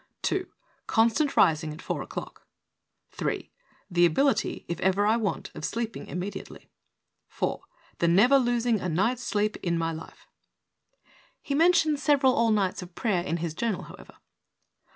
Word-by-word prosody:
"2. 375 -1 -1 0.4
Constant 230 +6 +2
rising 155 -1 +3
at 155 - -9
4 - - -3
o'clock. - - -8 0.6
3. - - -3 0.4
The 175 -2 +2
ability, 265 - +2
if 170 - -4
ever 190 +2 +2
I 215 +2 +4
want, 220 -4 -2
of - - -9
sleeping 230 +4 -3
immediately. 185 +3 -7 0.6
4. - - -3 0.4
The 170 - +2
never 230 +11 +5
losing 240 -2 +1
a 180 - -2
night's 220 +10 +1
sleep 210 -4 -1
in 170 -2 -1
my 165 0 -1
life." 160 0 -10 1.2
(He 280 - -3
mentions 315 -2 +3
several 275 -4 +4
all 230 -1 +2
nights 200 -3 +1
of 180 -1 -11
prayer 200 -7 0
in 170 -1 -2
his 165 -2 -3
journal, 215 +3 -2
however.) - - -13
210 Hz, 150 wpm, -27 LUFS, 175-245 Hz, 1.2 s, never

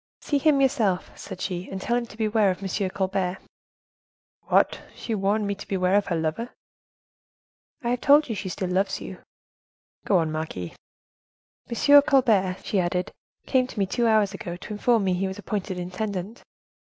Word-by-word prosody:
"'See 285 - 0
him 290 -1 +4
yourself,' 235 -9 +1
said 190 -2 -9
she, 180 -1 -4
'and 195 - -5
tell 235 +5 -1
him 240 -1 -1
to 215 - -14
beware 215 -2 +2
of 185 +1 -3
M. 195 0 -1
Colbert.'" 190 -1 -1 1.1
"What! - - +3
she 230 - -4
warned 205 +1 +1
me 200 - -1
to 200 - -10
beware 185 -1 +1
of 205 0 +3
her 175 - 0
lover?" 165 +9 -2 1.3
"I 235 - -1
have 245 0 -1
told 290 +2 +5
you 230 - -2
she 195 -2 -4
still 185 0 -3
loves 195 +1 0
you." - - -8 0.9
"Go 195 - +4
on, 160 -2 0
marquise." 155 - -5 0.9
"'M. 285 +5 +6
Colbert,' 220 -10 +2
she 200 - 0
added, 180 0 -1 0.3
'came 255 -2 +2
to 245 - -12
me 200 - +2
two 235 +5 0
hours 215 -3 +3
ago, 175 -3 -6
to 195 - -8
inform 225 +1 +2
me 190 -1 +1
he 190 +2 -1
was 190 +1 -6
appointed 200 -2 -4
intendant. 190 +4 -4
200 Hz, 180 wpm, -25 LUFS, 185-230 Hz, 1.3 s, M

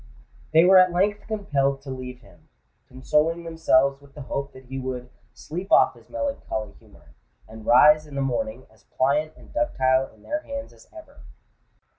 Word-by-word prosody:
They 160 +2 +6
were 190 +1 +8
at 185 0 +5
length 200 +4 0
compelled 140 -11 -1
to 135 - -7
leave 125 -1 -8
him—consoling 150 +9 -3
themselves 140 -4 +2
with 140 -1 -20
the 145 - -8
hope 140 +1 -4
that 130 0 -14
he 135 +1 -6
would 125 -1 -6 0.2
"sleep 175 - -7
off - - +5
his - - -20
melancholy 280 - -4
humour," - - -21 0.3
and 110 -1 -12
rise 150 +5 +6
in 145 - -11
the 140 - -1
morning 125 -2 -3
as 110 -2 -26
pliant 150 +4 0
and - - -17
ductile 135 - +1
in - - -23
their 300 +1 -3
hands 280 -1 -7
as - - -20
ever. 315 -3 -14
140 Hz, 170 wpm, -24 LUFS, 130-180 Hz, 0.3 s, were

